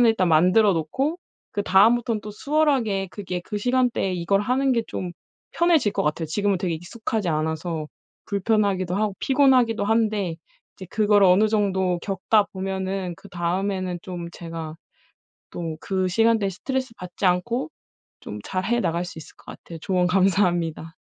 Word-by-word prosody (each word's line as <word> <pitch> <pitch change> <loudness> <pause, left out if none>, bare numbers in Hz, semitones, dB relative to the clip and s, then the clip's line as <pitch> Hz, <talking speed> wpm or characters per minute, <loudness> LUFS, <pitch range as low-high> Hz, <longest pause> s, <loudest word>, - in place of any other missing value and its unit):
습관을 235 -2 +6
일단 185 -5 +1
만들어 185 +6 +5
놓고 265 - -1 0.3
그다음부터는 215 +3 +3
또 210 0 -8
수월하게 250 -7 +1
그게 185 -3 -5
그 210 - -2
시간대에 245 -4 +1
이걸 180 +3 +1
하는 255 +5 +1
게 230 -2 +1
좀 180 -2 -5 0.4
편해질 330 - +3
것 - - -1
같아요. 155 +2 -1
지금은 200 +4 0
되게 175 -3 -1
익숙하지 205 +3 -4
않아서 160 0 -2 0.4
불편하기도 200 -3 0
하고 210 -1 0
피곤하기도 255 -6 +3
한데 210 -6 +1 0.4
이제 190 - -10
그거를 205 -2 +4
어느 195 +4 +5
정도 190 -4 +1
겪다 200 +2 +2
보면은 190 -1 -3
그다음에는 185 0 -2
좀 175 -2 -6
제가 165 -2 -7 0.8
또 165 -2 -5
그 190 -1 -1
시간대에 225 +1 +2
스트레스받지 230 -4 -4
않고 180 +1 0 0.5
좀 105 - -7
잘 185 0 -3
해 240 +3 +1
나갈 170 -1 -1
수 170 - -9
있을 155 - -13
것 - - -22
같아요. 165 -1 -11
조언 180 -2 +1
감사합니다. 175 -4 +1
195 Hz, 345 characters per minute, -24 LUFS, 175-220 Hz, 0.8 s, 습관을